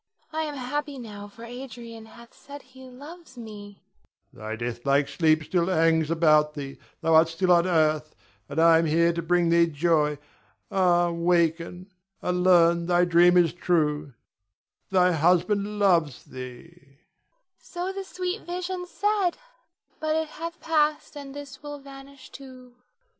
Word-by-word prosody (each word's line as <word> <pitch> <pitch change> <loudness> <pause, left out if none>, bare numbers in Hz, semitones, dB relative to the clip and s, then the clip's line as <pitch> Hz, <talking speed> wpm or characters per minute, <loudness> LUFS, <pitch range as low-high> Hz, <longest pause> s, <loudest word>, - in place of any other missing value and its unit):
I 315 - -1
am 295 -1 -6
happy 285 +2 -4
now 205 -4 -9
for 230 +3 -14
Adrian 235 -2 -10
hath 235 +1 -16
said 285 0 -12
he 260 0 -15
loves 285 +2 -13
me. 205 -3 -11 0.5
Adrian. - - -42
Thy 110 +1 -6
deathlike 120 +5 -1
sleep 155 +1 +2
still 170 +2 0
hangs 160 -3 +2
about 155 -2 +3
thee, 140 -2 -7 0.2
thou 165 -1 +1
art 160 +1 +6
still 180 +3 0
on 170 +1 +4
earth, 155 -3 +1 0.3
and 145 +2 -3
I 165 0 +6
am 165 - 0
here 170 +2 +2
to 170 - -3
bring 175 0 +1
thee 170 0 +4
joy. 150 -1 +1 0.5
Ah, 175 -2 +2
waken 170 +2 0 0.3
and 180 0 -1
learn 170 -2 +4
thy 175 0 +3
dream 175 +1 +5
is 170 -3 +3
true. 150 -6 -1 0.7
Thy 180 -1 +3
husband 180 +6 +1
loves 170 -9 +2
thee. 125 -1 -9
Nina. 140 -6 -25 0.6
So 360 +2 -5
the 390 0 -5
sweet 370 +2 -4
vision 360 +1 -4
said, 400 -2 0 0.6
but 310 0 -1
it 320 -1 -1
hath 335 +2 -7
passed, 305 -1 0
and 280 -1 -9
this 280 -2 -10
will 290 -1 -7
vanish 275 -1 -14
too. 255 -2 -13
180 Hz, 155 wpm, -25 LUFS, 165-270 Hz, 0.7 s, art